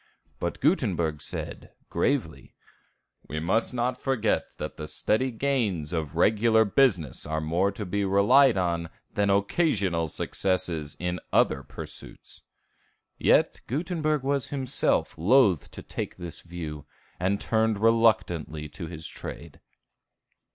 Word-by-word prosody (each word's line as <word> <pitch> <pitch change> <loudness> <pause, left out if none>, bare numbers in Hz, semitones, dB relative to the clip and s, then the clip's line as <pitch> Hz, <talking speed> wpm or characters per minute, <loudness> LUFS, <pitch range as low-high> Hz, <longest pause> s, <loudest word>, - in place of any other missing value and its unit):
But 85 - -3
Gutenberg 90 - +1
said, 75 - -6 0.2
gravely, 85 - -1 0.7
"We 75 - -3
must 95 +8 +1
not 125 +1 -1
forget 120 -6 +1
that - - -5
the 75 - -6
steady 120 +10 +1
gains 110 - -1
of 80 -3 -3
a - - -3
regular 110 +2 +4
business 100 - +2
are 80 0 -1
more 85 +6 +1
to 105 +1 -5
be 100 +2 -1
relied 105 +6 +5
on 85 -2 -1 0.2
than 100 -1 +1
occasional 100 - +1
successes 85 -3 0
in 90 0 -2
other 65 - +3
pursuits." - - -7 0.8
Yet - - +3
Gutenberg 155 0 -1
was 140 -1 0
himself 135 - 0
loath 100 - +4
to - - -10
take - - -5
this 85 -2 -7
view, 80 -4 -7 0.3
and 95 +3 +1
turned 110 -1 +1
reluctantly 100 -9 +2
to 85 +3 -7
his 80 -1 -7
trade. - - -8
100 Hz, 125 wpm, -27 LUFS, 85-120 Hz, 0.8 s, relied